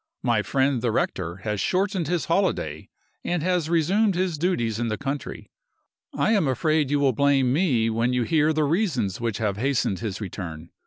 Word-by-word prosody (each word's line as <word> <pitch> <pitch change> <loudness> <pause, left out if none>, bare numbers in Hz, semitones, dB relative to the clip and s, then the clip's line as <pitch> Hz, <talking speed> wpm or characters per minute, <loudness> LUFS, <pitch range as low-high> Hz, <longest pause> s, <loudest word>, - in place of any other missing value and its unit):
My - - +2
friend 135 -2 +1
the 120 -1 0
rector 85 -5 -1
has 105 -2 -2
shortened 190 -3 0
his 175 0 -1
holiday, 190 +4 -1 0.3
and 175 -3 -1
has 180 -3 0
resumed 185 +5 +2
his 180 -4 -1
duties 120 - 0
in 120 - -1
the 110 -1 -2
country. 140 0 -5 0.6
I - - +1
am 200 -9 +2
afraid 155 +2 +1
you 145 0 +1
will 140 -2 +3
blame 135 -1 +2
me 135 -9 +2
when 115 +2 +1
you 125 -1 +1
hear 155 +5 +2
of 160 - 0
the 155 - +2
reasons 140 - 0
which 115 -3 -1
have 105 -3 -1
hastened 125 -5 0
his 105 -3 -4
return. 85 -5 -7
140 Hz, 190 wpm, -24 LUFS, 115-170 Hz, 0.6 s, will